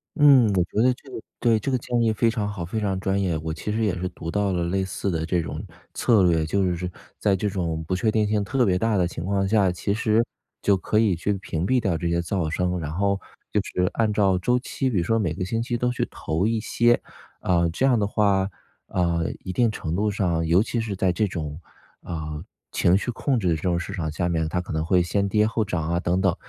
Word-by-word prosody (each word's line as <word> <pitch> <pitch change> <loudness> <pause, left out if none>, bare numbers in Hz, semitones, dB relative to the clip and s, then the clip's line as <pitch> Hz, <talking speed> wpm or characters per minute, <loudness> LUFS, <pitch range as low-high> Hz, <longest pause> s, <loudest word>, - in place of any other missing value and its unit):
嗯， 140 -6 +7
我 90 -2 +3
觉 105 +5 -1
得 125 +1 +4
这 135 - -17
个 - - -6 0.2
对， 115 -2 +3
这 135 - -2
个 130 - +2
建 120 0 -1
议 115 -1 +3
非 115 +2 +2
常 105 -2 -1
好， 100 -5 -5
非 110 +6 -3
常 95 -3 -1
专 95 +1 0
业。 90 -5 0
我 80 0 -4
其 105 - -4
实 110 +1 0
也 100 - +1
是 90 - -2
读 80 - -7
到 105 -1 +1
了 90 -2 0
类 95 +3 0
似 95 +1 -3
的 80 -1 -1
这 85 +1 +1
种 80 - -5 0.3
策 110 -6 +3
略， 80 -3 +3
就 90 +1 +1
是 90 +1 -4 0.3
在 100 -2 +2
这 105 +2 -1
种 85 -4 -2
不 95 - 0
确 110 +4 +1
定 105 -1 +2
性 105 -1 +1
特 130 +4 +1
别 90 -2 +2
大 110 +2 +1
的 90 -2 +2
情 85 -1 -6
况 95 0 0
下， 100 -3 +3
其 95 +3 -2
实 110 +1 +2 0.4
就 100 - +3
可 105 +3 0
以 105 -5 +3
去 95 +5 -1
屏 85 -3 -3
蔽 130 +4 +3
掉 95 -7 0
这 85 +1 -2
些 85 0 +1
噪 85 -1 -1
声， 90 +2 -1
然 75 -2 -4
后 100 +3 0 0.3
就 - - +2
是 90 0 -1
按 110 -2 +1
照 100 -3 +3
周 125 +7 +1
期， 130 +1 -2
比 115 - -1
如 85 - +2
说 115 +6 +1
每 85 -7 0
个 90 +2 -3
星 115 +4 -1
期 120 0 -2
都 125 +1 0
去 125 - -2
投 80 +5 -2
一 115 0 +1
些。 120 +2 +2 0.4
呃， 85 -2 +2
这 105 +11 0
样 125 -3 +4
的 105 - +1
话， 100 -2 +2 0.4
呃， 85 -2 0
一 95 - -3
定 115 +2 +2
程 85 -6 -4
度 105 +2 +1
上， 85 -5 0
尤 85 +4 +4
其 115 +1 -1
是 110 -3 -3
在 95 -1 +1
这 105 +4 +1
种， 80 -4 -5 0.4
啊， 75 -1 -5 0.3
情 90 +2 +4
绪 105 - -3
控 130 +1 0
制 95 - -1
这 75 - -6
种 85 -2 +1
市 - - -5
场 80 -4 -3
下 85 +3 -1
面， 80 -2 0
它 90 - -1
可 90 -2 -5
能 80 - 0
会 90 +2 +3
先 100 +3 0
跌 105 +1 +3
后 110 0 0
涨 85 -6 -2
啊， 85 +1 +1
等 90 +2 +1
等， 95 -2 +2
95 Hz, 275 characters per minute, -24 LUFS, 85-110 Hz, 0.4 s, 嗯